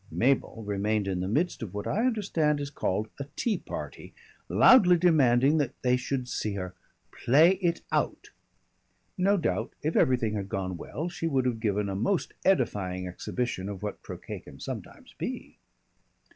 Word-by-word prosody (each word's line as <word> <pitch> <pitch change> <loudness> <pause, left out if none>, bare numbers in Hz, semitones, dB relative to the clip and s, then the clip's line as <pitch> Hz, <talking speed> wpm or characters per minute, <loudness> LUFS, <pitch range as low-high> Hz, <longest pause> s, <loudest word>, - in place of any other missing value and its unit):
Mabel 125 -3 +1
remained 105 0 0
in 95 -2 -1
the 90 - -2
midst 150 - 0
of 105 -4 -6
what 105 - -4
I 230 +5 +1
understand 170 - +1
is 145 0 -4
called 105 -5 -1
a 140 - -5
tea 230 -3 0
party, - - -8 0.3
loudly 180 -9 +7
demanding 145 -4 +4
that 145 - -2
they 125 0 +4
should 125 0 -2
see 105 -4 -2
her 90 -2 -5 0.4
"play 160 +9 +4
it 170 -2 0
out." - - -1 0.8
No 195 +2 +3
doubt 110 - -1
if 155 +2 -1
everything 120 -4 +3
had 100 -2 -3
gone 95 -1 -3
well 150 - -5
she 165 -1 -3
would 135 -5 +1
have 120 -3 0
given 105 -2 0
a 100 - -3
most 145 - 0
edifying 100 - +1
exhibition 100 +2 -3
of 100 -1 -7
what 105 - -5
croquet - - -7
can - - -14
sometimes - - -8
be. - - -5
125 Hz, 165 wpm, -28 LUFS, 100-160 Hz, 0.8 s, loudly